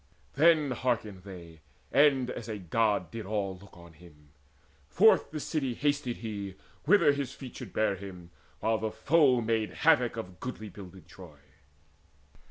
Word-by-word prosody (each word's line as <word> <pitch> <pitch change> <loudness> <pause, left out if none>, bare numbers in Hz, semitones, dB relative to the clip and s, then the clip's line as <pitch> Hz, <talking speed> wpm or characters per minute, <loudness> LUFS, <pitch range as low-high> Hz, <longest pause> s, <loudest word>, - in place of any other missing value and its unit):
Then 155 -1 +4
hearkened 110 -6 -2
they, 85 -4 -12 0.3
and 135 -3 +4
as 115 -2 -7
a 110 - -3
God 105 +3 0
did 115 -4 -7
all 100 -2 -2
Look 100 -2 -16
on 85 -1 -14
him. 75 -3 -18 0.6
Forth 210 - +4
the 155 - -5
city 140 -5 -2
hasted 145 -4 -1
he 100 -4 -6 0.3
Whither 205 -8 +5
his 140 -3 -3
feet 130 -3 -10
should - - -8
bear 110 -2 +1
him, 90 -3 -10 0.3
while 110 0 +1
the 110 +1 -2
foe 130 +3 +3
Made 110 -1 0 0.2
havoc 135 -7 +4
still 115 - -3
of 90 -2 -17
goodly 110 -4 -6
builded 95 -1 -12
Troy. 85 -6 -13
110 Hz, 160 wpm, -29 LUFS, 95-130 Hz, 0.6 s, Whither